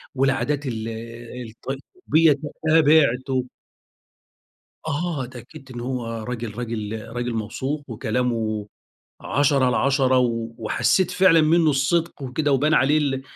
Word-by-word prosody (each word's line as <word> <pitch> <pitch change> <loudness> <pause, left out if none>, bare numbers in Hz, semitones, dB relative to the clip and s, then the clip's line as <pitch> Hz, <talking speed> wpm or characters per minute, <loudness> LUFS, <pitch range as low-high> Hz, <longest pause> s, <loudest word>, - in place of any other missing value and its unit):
والعادات 135 +2 0
ال 115 -2 -4 0.6
الطبّية 150 - 0
ت 140 - -9 0.3
تابعته. 140 -5 +3 1.4
آه. 155 -3 -2
اتأكدت 130 +3 -12
إنه 120 -1 -6
هو 125 -2 -3 0.2
راجل 115 -2 -5
راجل 110 -2 -4
راجل 120 +1 -3
موثوق، 130 +7 -3
وكلامه 110 -2 -1 0.5
عشرة 140 -2 +2
على 125 -1 +2
عشرة. 135 -2 +3
و 115 -2 -1
وحسّيت 120 - +1
فعلًا 185 -3 +5
منّه 160 0 +4
الصِدق 145 +3 0
وكده 140 +3 -1
وبان 150 +4 +3
عليه 145 +4 +4
ال 135 -3 -1
130 Hz, 115 wpm, -23 LUFS, 120-150 Hz, 1.4 s, فعلًا